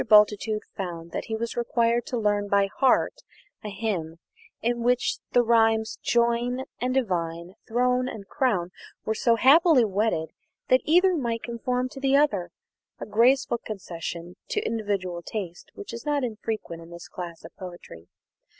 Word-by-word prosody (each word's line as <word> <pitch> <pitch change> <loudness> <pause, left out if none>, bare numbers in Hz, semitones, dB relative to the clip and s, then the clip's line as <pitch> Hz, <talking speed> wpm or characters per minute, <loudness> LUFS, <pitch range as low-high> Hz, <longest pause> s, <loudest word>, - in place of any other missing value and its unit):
Bultitude 210 0 +4
found 170 -3 -5
that - - -4
he 220 - -3
was 230 +1 -3
required 235 0 +1
to 250 - -2
learn 205 -2 +1
by 200 0 +3
heart 265 - +3 0.4
a 210 - -4
hymn 190 -6 -3 0.4
in 240 +1 -1
which 245 +1 +1
the 245 - +5
rhymes 225 -1 +2
"join" 240 +2 +1 0.2
and 255 +1 -1
"divine," 175 -7 -1
"throne" 250 +2 +1
and 200 -6 -8
"crown," 210 -11 0 0.3
were 220 - +1
so 230 +1 +3
happily 280 +1 +6
wedded 200 -5 0 0.4
that 255 - +5
either 360 +4 +4
might 235 -6 -2
conform 250 +1 -2
to 270 - -9
the 270 0 +3
other 205 -12 +2 0.5
a - - -5
graceful 235 +3 +3
concession 175 -4 -6
to - - 0
individual 200 -6 -2
taste 175 -1 -6
which 200 - -8
is 235 - -6
not 290 -2 0
infrequent 215 -7 -4
in 165 - -12
this 170 +1 -10
class 170 -2 -8
of - - -12
poetry. 175 - -10
225 Hz, 155 wpm, -26 LUFS, 185-245 Hz, 0.5 s, happily